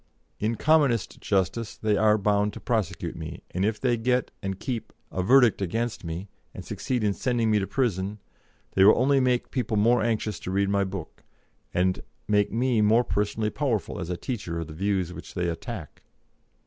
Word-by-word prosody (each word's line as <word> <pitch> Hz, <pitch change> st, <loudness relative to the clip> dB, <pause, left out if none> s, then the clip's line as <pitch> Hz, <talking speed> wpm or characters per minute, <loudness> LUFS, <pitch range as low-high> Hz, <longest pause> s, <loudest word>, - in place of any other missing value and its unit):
In 110 Hz, +2 st, 0 dB
commonest 145 Hz, -6 st, +2 dB
justice 105 Hz, +3 st, -1 dB
they 110 Hz, -1 st, +1 dB
are 105 Hz, +1 st, +4 dB
bound 105 Hz, 0 st, +1 dB
to -, -, -8 dB
prosecute 95 Hz, -8 st, -2 dB
me, 80 Hz, -2 st, -7 dB
and 90 Hz, -, -1 dB
if 105 Hz, +1 st, 0 dB
they 120 Hz, -2 st, +1 dB
get, 125 Hz, +2 st, 0 dB
and 95 Hz, -1 st, -4 dB
keep, 120 Hz, -4 st, -4 dB, 0.2 s
a 95 Hz, -, -1 dB
verdict 120 Hz, +2 st, +5 dB
against 115 Hz, +5 st, -2 dB
me, 85 Hz, +4 st, -5 dB, 0.3 s
and -, -, -8 dB
succeed 125 Hz, -3 st, -2 dB
in 105 Hz, -1 st, +2 dB
sending 120 Hz, -1 st, 0 dB
me 105 Hz, -, +4 dB
to 95 Hz, -, -2 dB
prison, 105 Hz, -, -1 dB, 0.5 s
they 95 Hz, -, +4 dB
will 105 Hz, -, +7 dB
only 135 Hz, +3 st, +4 dB
make 125 Hz, -2 st, +1 dB
people 120 Hz, -4 st, -1 dB
more 115 Hz, +3 st, +4 dB
anxious 110 Hz, -3 st, -1 dB
to -, -, -6 dB
read 100 Hz, +1 st, +1 dB
my 100 Hz, 0 st, +2 dB
book, 95 Hz, -4 st, -7 dB, 0.5 s
and 90 Hz, +1 st, +1 dB, 0.3 s
make 105 Hz, -1 st, +2 dB
me 120 Hz, 0 st, +2 dB
more 110 Hz, +3 st, +5 dB
personally 105 Hz, 0 st, -1 dB
powerful 130 Hz, -8 st, -1 dB
as 90 Hz, -2 st, -4 dB
a 90 Hz, -, -2 dB
teacher 95 Hz, -9 st, -4 dB
of 80 Hz, -, -3 dB
the 75 Hz, -, -9 dB
views 95 Hz, 0 st, -1 dB
which -, -, -10 dB
they 90 Hz, -1 st, 0 dB
attack." 85 Hz, -, -6 dB
105 Hz, 185 wpm, -26 LUFS, 95-120 Hz, 0.5 s, will